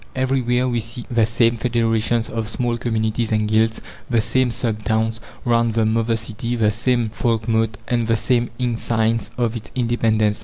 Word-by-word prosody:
Everywhere 130 -1 +1
we 120 -2 0
see 115 +2 -6
the 115 -2 +3
same 115 0 +2
federations 115 -1 +1
of 110 -2 -3
small 120 +1 -1
communities 110 -1 -1
and 110 -1 +1
guilds, 110 +1 +2 0.3
the 120 -3 +3
same 130 +3 +2
"sub 115 -2 -2
towns" 110 +1 0 0.3
round 115 -2 +2
the 115 -1 +2
mother 115 +1 +1
city, 115 +2 -3
the 110 -3 +2
same 120 0 0
folkmote, 110 -1 0
and 120 -2 0
the 115 - +3
same 120 +1 +1
insigns 115 -2 0
of 120 -2 0
its 115 - -7
independence. 115 -4 +1
115 Hz, 165 wpm, -21 LUFS, 110-120 Hz, 0.3 s, the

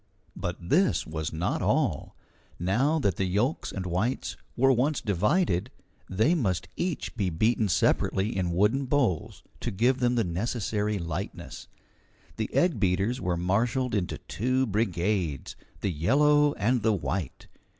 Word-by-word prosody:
But 90 0 -4
this 90 - +2
was 80 0 -4
not 80 +3 -1
all. - - 0 0.4
Now 125 - +1
that 100 - 0
the 95 - 0
yolks 105 - 0
and 95 -2 -5
whites 95 +9 -1 0.2
were 135 +2 +5
once 135 +4 +1
divided, 105 - +1 0.4
they 110 - +2
must 95 - 0
each 175 -2 -3
be 100 -5 0
beaten 110 +5 +1
separately 95 +4 +1
in 90 -2 0
wooden 105 +10 +2
bowls, 130 - 0 0.2
to - - -3
give 125 +7 +1
them 125 -1 +2
the 115 - +2
necessary 105 +3 -1
lightness. 85 +2 -6 0.7
The 110 - -3
egg 175 -10 +2
beaters 100 +6 +1
were 90 -1 -1
marshalled 115 +8 0
into 100 -5 -1
two 130 +4 -1
brigades, 95 - -1 0.3
the 100 - 0
yellow 145 - +3
and 120 +3 +1
the 110 +1 +2
white. 90 -5 -3
105 Hz, 140 wpm, -27 LUFS, 90-125 Hz, 0.7 s, were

